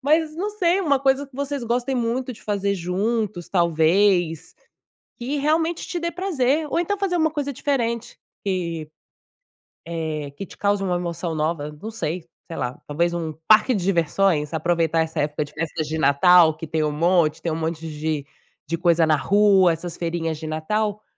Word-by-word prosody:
Mas, 310 +2 +2
não 395 +5 -2
sei, 380 -3 +1
uma 285 -7 +2
coisa 270 +1 +2
que 265 - -17
vocês 280 -1 -3
gostem 245 +3 -1
muito 245 +1 -1
de - - -15
fazer 200 -1 -1
juntos, 195 +1 -2
talvez. 170 0 +2 0.6
Que 260 +4 -3
realmente 320 +3 +1
te 350 - -3
dê 340 0 -2
prazer. 310 -5 0
Ou - - +1
então 380 +4 0
fazer 390 -3 0
uma 320 -2 +2
coisa 290 -2 -3
diferente, 235 -4 -2 0.3
que, 170 -5 -2 1.0
eh, 160 -3 -4
que 195 - -5
te - - -14
cause 200 -1 +1
uma 180 -2 0
emoção 170 -1 -3
nova, 155 -1 -1
não 220 - -5
sei, 175 -6 -4 0.2
sei 165 - -7
lá, 125 +1 -3
talvez 170 +4 0
um 165 -2 -3 0.2
parque 220 +4 +6
de 195 - -1
diversões, 170 -3 +1
aproveitar 165 0 +1
essa 160 0 -1
época 150 +1 -1
de 145 - -14
festas 160 -1 -3
de 160 +1 -2
Natal 160 +3 +6
que 165 - -7
tem 160 0 -1
um 150 - +1
monte, 165 0 +2
tem 165 - -1
um 155 - -2
monte 165 0 -3
de 150 -2 -3 0.4
de 170 - -2
coisa 170 -1 +3
na 155 - +4
rua, 195 0 +4
essas 165 +1 -6
feirinhas 165 -2 -2
de 155 - -6
Natal, 210 +7 -1
180 Hz, 180 wpm, -23 LUFS, 160-250 Hz, 1.0 s, parque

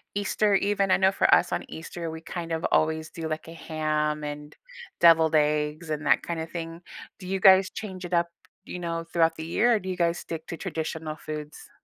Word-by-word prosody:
Easter 205 0 +1
even? 200 -1 +1
I - - +5
know 190 0 +3
for - - +3
us - - +4
on - - -1
Easter, 165 +1 -6
we 160 - -7
kind 170 0 -6
of 160 0 -2
always 160 0 +1
do, 160 -1 -6
like, 155 +1 -4
a 165 - -9
ham 155 -2 -2
and 150 0 -7 0.5
deviled 165 -2 +6
eggs 150 +1 +1
and 155 0 -3
that - - +4
kind 170 -1 -3
of 160 - -7
thing. 165 0 -6 0.4
Do 185 - -9
you 190 +1 -1
guys 190 0 +7
change 190 -4 -7
it 175 0 -6
up, 170 0 +3 0.4
you 180 - -6
know, 165 -1 -3
throughout 165 -1 +3
the 160 - -5
year, 235 +8 +3
or - - +1
do 190 - -10
you 185 - -2
guys 170 -1 +1
stick 160 -1 -7
to 165 - -6
traditional 160 -3 -4
foods? 150 -1 -8
165 Hz, 220 wpm, -26 LUFS, 155-180 Hz, 0.5 s, guys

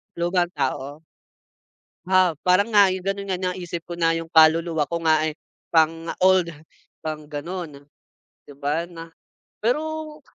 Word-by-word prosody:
Lumang 175 +1 +1
tao. 140 +2 -3 1.0
Ah, 185 -3 +3
parang 185 +4 +4
nga, 205 -2 +6
'yon 185 - -4
gano'n 195 +1 -3
nga, - - -1
naisip 175 -2 -5
ko 175 - -5
na, 165 -1 +2
yung 165 0 -4
kaluluwa 160 -1 +4
ko 170 +3 -4
nga 155 -1 +3
eh, 155 - -2 0.4
pang 165 0 +3 0.2
old, 185 -3 +4 0.5
pang 155 -1 -5
gano'n. 150 0 -6 0.6
'Di - - -17
ba 145 +3 -1
na 165 -1 -9 0.5
pero 310 +5 -2
170 Hz, 140 wpm, -23 LUFS, 155-185 Hz, 1.0 s, nga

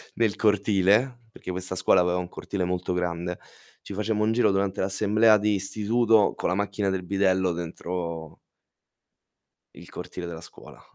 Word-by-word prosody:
nel 115 -3 +1
cortile, 105 +4 +2
perché 95 - -7
questa 90 +1 -4
scuola 90 0 +4
aveva 90 0 +1
un 90 -1 -3
cortile 95 +1 -4
molto 90 0 -2
grande, 90 0 -2 0.4
ci - - -9
facemmo 105 +1 -1
un 110 - +1
giro 120 -3 +3
durante 95 0 -1
l'assemblea 105 +3 +3
di 105 0 +1
istituto 110 +2 +2
con - - -2
la 90 - 0
macchina 100 0 -1
del 95 -1 -2
bidello 95 -2 +1
dentro 85 -1 -5 1.4
il - - -12
cortile 90 - -7
della 85 -2 -7
scuola. - - -14
95 Hz, 155 wpm, -26 LUFS, 90-105 Hz, 1.4 s, scuola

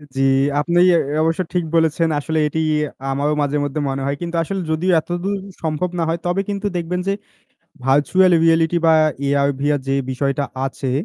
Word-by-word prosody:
জী, 135 - 0 0.4
আপনি 170 +3 +1 0.2
এ - - +5 0.3
অবশ্য 165 +2 +1
ঠিক 175 -1 +1
বলেছেন, 165 0 +2
আসলে 160 +2 -2
এটি 160 +2 -3 0.5
আমারও 145 +2 0
মাঝে 145 0 0
মধ্যে 145 +1 -3
মনে 135 0 -3
হয়। 140 +1 -1
কিন্তু 170 0 -4
আসলে 195 +3 -3
যদিও 175 +4 +1
এতদূর 175 +5 -3 0.3
সম্ভব 160 +3 -1
না - - +1
হয়, 165 +1 -1
তবে 175 +2 +1
কিন্তু 200 0 -2
দেখবেন 175 +1 -2
যে 195 - +2 0.7
ভার্চুয়াল 160 +7 +3
রিয়েলিটি 165 +1 +3
বা 160 - +6 0.3
AR/VR 140 +1 +1
যে 135 - +1 0.2
বিষয়টা 140 +2 -1 0.2
আছে, 135 -1 -4
160 Hz, 170 wpm, -19 LUFS, 145-175 Hz, 0.7 s, বা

